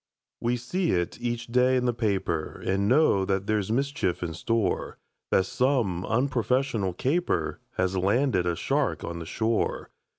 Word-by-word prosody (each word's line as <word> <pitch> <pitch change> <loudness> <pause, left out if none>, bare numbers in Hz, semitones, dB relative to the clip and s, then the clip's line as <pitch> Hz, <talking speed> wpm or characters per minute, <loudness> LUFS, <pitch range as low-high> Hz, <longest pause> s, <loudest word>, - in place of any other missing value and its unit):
We 120 +1 0
see 170 +9 -1
it 85 +4 -2
each 120 -1 -2
day 125 +2 +3
in 125 - 0
the 120 - +2
paper, 95 -8 -1
And 100 +1 +1
know 125 -6 +4
that 95 0 -1
there's 105 -1 0
mischief 135 -9 0
in 85 -2 -3
store; 105 +3 -1 0.3
That 95 - +3
some 120 -9 0
unprofessional 125 -4 0
caper 160 - 0 0.2
Has 95 +1 +1
landed 100 0 +2
a 85 - +1
shark - - 0
on 85 0 -5
the 85 - -7
shore. 110 +4 -1
110 Hz, 155 wpm, -27 LUFS, 95-125 Hz, 0.3 s, know